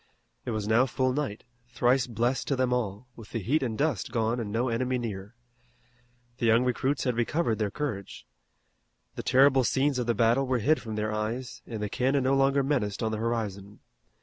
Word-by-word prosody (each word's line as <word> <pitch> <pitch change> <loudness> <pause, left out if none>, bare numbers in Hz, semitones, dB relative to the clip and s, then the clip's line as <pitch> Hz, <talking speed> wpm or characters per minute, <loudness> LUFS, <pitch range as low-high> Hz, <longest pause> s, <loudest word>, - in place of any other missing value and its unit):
It - - -3
was 110 -3 -2
now 115 +4 +4
full 130 -1 0
night, 135 -7 -3 0.2
thrice 125 +1 +2
blessed 120 +3 -1
to 140 - +1
them 130 -1 +1
all, 115 -1 -2
with 110 -3 -12
the - - -3
heat 130 +10 +1
and 115 -4 -2
dust 140 - -1
gone 115 0 0
and 105 -3 -4
no 120 +4 0
enemy 125 +2 0
near. 105 -2 -6 1.0
The 115 - +1
young 115 +2 +5
recruits 130 +3 0
had 125 -3 0
recovered 120 -1 0
their 105 -2 0
courage. 105 -6 -5 0.9
The - - -5
terrible 135 0 +4
scenes 135 +2 +1
of 120 - -2
the 120 - +2
battle 120 +5 +3
were 130 -1 +1
hid 150 +8 +2
from 110 -3 -6
their 105 0 -2
eyes, 115 +4 -4
and 110 -3 -5
the - - -1
cannon 135 +5 +1
no 130 +1 +2
longer 135 0 +3
menaced 120 -8 -1
on 110 - 0
the 110 - -3
horizon. 105 -3 -3
120 Hz, 200 wpm, -28 LUFS, 110-130 Hz, 1.0 s, young